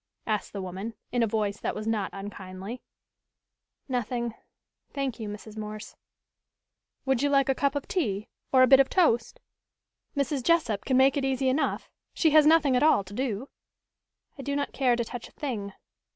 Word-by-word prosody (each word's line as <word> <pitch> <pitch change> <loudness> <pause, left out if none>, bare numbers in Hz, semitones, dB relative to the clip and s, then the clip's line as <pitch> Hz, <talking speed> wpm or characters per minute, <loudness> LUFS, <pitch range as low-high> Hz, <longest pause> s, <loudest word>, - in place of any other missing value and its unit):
asked 215 -2 -2
the 200 -2 -5
woman, 190 +5 -6 0.2
in 245 - +1
a 230 - +3
voice 210 -1 -1
that - - -2
was 215 - -5
not 220 -3 0
unkindly. 195 +3 -7 1.1
"Nothing, 240 -2 -2 0.6
thank 275 -4 -3
you, 215 -2 -4
Mrs. 210 +1 -9
Morse." 215 0 -7 1.1
"Would 265 -2 +1
you 285 - +2
like 275 -1 +3
a - - +5
cup 280 +1 0
of 285 - -3
tea, 215 - -1 0.2
or 260 -1 +6
a - - +6
bit 270 0 +8
of 270 - +4
toast? 240 -11 +2 0.8
Mrs. 280 -1 0
Jessup 245 -9 +1
can 260 - +2
make 270 +2 +5
it 280 - 0
easy 265 0 +1
enough 275 +4 0 0.3
she 320 - +3
has 305 0 +7
nothing 310 -4 +5
at 250 - +3
all 300 -9 +5
to 190 +1 -12
do." 250 +1 -3 0.9
"I - - -3
do 280 +1 -2
not 285 0 -2
care 255 -3 +2
to 235 -1 -1
touch 240 0 -7
a - - -20
thing." 220 -9 -4
245 Hz, 180 wpm, -27 LUFS, 210-275 Hz, 1.1 s, bit